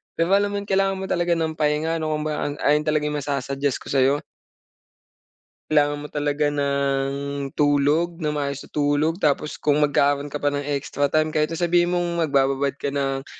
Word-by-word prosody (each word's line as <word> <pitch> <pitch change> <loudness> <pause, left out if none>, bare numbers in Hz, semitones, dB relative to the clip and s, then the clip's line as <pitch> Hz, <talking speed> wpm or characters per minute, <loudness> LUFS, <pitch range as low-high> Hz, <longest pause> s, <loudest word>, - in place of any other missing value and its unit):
pero 165 +2 0
alam 200 +1 +4
mo 205 - -4
'yon, - - -15
kailangan 195 0 +2
mo 190 0 -5
talaga 175 0 +1
ng 160 -1 -2
pahinga 155 +2 +1
'no. 155 - -2
Kumbaga 150 0 -2
an 145 - -4
ayun 150 +1 +2
talaga 155 -1 +1
'yong 150 0 -1
masa-suggest 140 -1 -2
ko - - -14
sa'yo. 135 0 +3 1.5
Kailangan 145 -1 +3
mo 145 0 -7
talaga 145 0 0
ng 140 0 -1
tulog 150 +4 +2
nang 150 -1 -1
maayos 140 -1 -3
na - - -13
tulog 150 +3 +1
tapos 150 -3 0
kung 150 0 +1
magkakaroon 145 0 +2
ka 145 - -4
pa 145 0 0
ng 145 - -1
extra 145 0 -1
time 155 +1 +1
kahit 155 0 +1
na 165 - -4
sabihin 175 0 +2
mong 175 -1 -1
magbababad 140 -2 +1
ka 140 0 -3
ng, 135 -1 -1
145 Hz, 190 wpm, -23 LUFS, 140-160 Hz, 1.5 s, alam